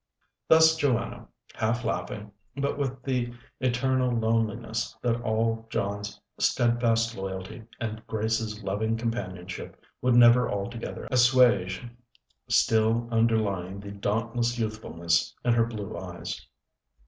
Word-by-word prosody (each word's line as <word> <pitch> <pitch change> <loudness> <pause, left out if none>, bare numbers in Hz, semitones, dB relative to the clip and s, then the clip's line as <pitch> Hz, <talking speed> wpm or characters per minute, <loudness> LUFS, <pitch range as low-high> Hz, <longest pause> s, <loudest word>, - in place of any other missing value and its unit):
Thus 160 0 +6
Joanna, 120 -6 -1 0.3
half 115 +2 -1
laughing, 105 -2 -3 0.3
but 140 0 0
with 135 -3 -3
the 125 -3 -1 0.3
eternal 130 0 +1
loneliness 110 - -1
that 120 -1 +1
all 115 0 0
John's 100 -1 -3 0.2
steadfast 115 -1 +2
loyalty 95 +3 -6
and 110 -1 -4
Grace's 110 -1 -2
loving 110 +3 -1
companionship 95 -6 -5 0.2
would 125 -1 +3
never 120 +1 +7
altogether 115 +4 -4
assuage 125 -6 +4 0.6
still 115 +1 +3
underlying 105 -5 +1
the 100 0 -8
dauntless 115 +4 -1
youthfulness 110 -7 -1
in 120 - +4
her 115 -1 +3
blue 105 -4 -6
eyes. 85 0 -6
115 Hz, 110 wpm, -27 LUFS, 105-120 Hz, 0.6 s, never